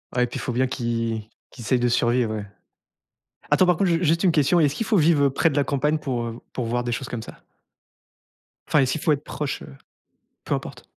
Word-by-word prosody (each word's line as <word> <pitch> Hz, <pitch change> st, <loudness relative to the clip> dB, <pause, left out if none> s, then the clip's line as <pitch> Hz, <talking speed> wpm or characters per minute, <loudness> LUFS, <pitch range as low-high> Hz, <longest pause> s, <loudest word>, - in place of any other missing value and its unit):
Ouais, 125 Hz, -, +3 dB
puis 120 Hz, -, -6 dB
faut 125 Hz, -, -3 dB
bien 130 Hz, +2 st, +1 dB
qu'ils 115 Hz, -3 st, -2 dB, 0.3 s
qu'ils 120 Hz, -, -11 dB
essayent 125 Hz, +3 st, +1 dB
de 120 Hz, -, +2 dB
survivre, 120 Hz, -1 st, +1 dB
ouais. 105 Hz, -1 st, -5 dB, 1.1 s
Attends 185 Hz, -, +5 dB
par 180 Hz, -2 st, +3 dB
contre 190 Hz, -2 st, +1 dB
ju 170 Hz, +1 st, +1 dB
juste 165 Hz, +2 st, +2 dB
une 185 Hz, -, +4 dB
question, 160 Hz, +3 st, +3 dB
est-ce 145 Hz, -3 st, +3 dB
qu'il 225 Hz, -, -3 dB
faut 220 Hz, -, +2 dB
vivre, 155 Hz, -3 st, +4 dB
heu, 140 Hz, -, +3 dB
près 160 Hz, +5 st, +2 dB
de 145 Hz, -, -4 dB
la 145 Hz, -, +3 dB
campagne 150 Hz, +2 st, 0 dB
pour, 130 Hz, -5 st, -3 dB
heu, 115 Hz, -, -3 dB
v 115 Hz, -, -10 dB
pour 125 Hz, -, -3 dB
voir 120 Hz, +1 st, -1 dB
des 120 Hz, -, -2 dB
choses 125 Hz, +2 st, -3 dB
comme 115 Hz, -2 st, -5 dB
ça? -, -, -11 dB, 1.3 s
Enfin 150 Hz, -, +3 dB
est-ce 130 Hz, -1 st, +2 dB
qu'il 160 Hz, -, -4 dB
faut -, -, +2 dB
être 145 Hz, +1 st, -4 dB
proche, 150 Hz, -2 st, -4 dB
heu? 65 Hz, -, -12 dB, 0.7 s
Peu -, -, -1 dB
importe? -, -, -6 dB
135 Hz, 240 wpm, -24 LUFS, 120-155 Hz, 1.3 s, Attends